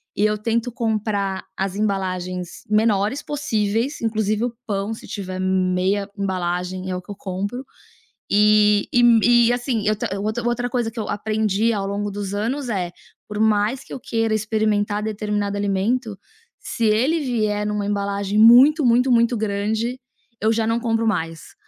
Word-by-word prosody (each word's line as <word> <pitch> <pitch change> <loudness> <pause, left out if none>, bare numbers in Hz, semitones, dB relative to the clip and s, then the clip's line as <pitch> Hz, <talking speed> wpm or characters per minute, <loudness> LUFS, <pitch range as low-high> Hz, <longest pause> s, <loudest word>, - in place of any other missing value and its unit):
e 205 - +2
eu 210 0 +1
tento 230 +3 -1
comprar 215 -4 -2
as 190 0 -2
embalagens 185 -3 -3
menores 215 +3 +2
possíveis. 235 -2 -1
Inclusive 215 -1 0
o 245 - -3
pão, 200 +1 -2
se 225 - -10
tiver 185 -2 -5
meia 185 +1 0
embalagem 185 -1 -2
é 185 - -2
o 180 - -4
que 185 - -11
eu - - -6
compro. 200 +7 -4 0.7
E 210 0 +4
e 245 0 +4
me 235 -1 +6 0.3
e, - - +3
assim, 245 -4 -2 0.3
outra 215 +4 -2
outra 245 +1 -1
coisa 240 -2 -1
que 230 - -7
eu 215 - -3
aprendi 215 +1 0
ao 200 -2 -2
longo 205 +1 -2
dos 200 -1 -5
anos 245 +7 -2
é, 185 -5 -2 0.4
por 210 0 -5
mais 220 +4 +2
que - - -11
eu - - -5
queira 225 -2 -1
experimentar 215 -1 0
determinado 210 -1 -2
alimento, 205 +3 -1 0.4
se 230 - -3
ele 245 +10 +2
vier 215 -6 -1
em - - -1
uma 210 -1 -2
embalagem 200 0 -1
muito, 260 +7 +7
muito, 250 +2 +3
muito 235 0 +3
grande, 220 +4 -2 0.4
eu 220 +1 +3
já 225 0 +1
não 230 +1 +1
compro 225 -1 0
mais. 165 -6 -3
210 Hz, 165 wpm, -22 LUFS, 200-230 Hz, 0.7 s, muito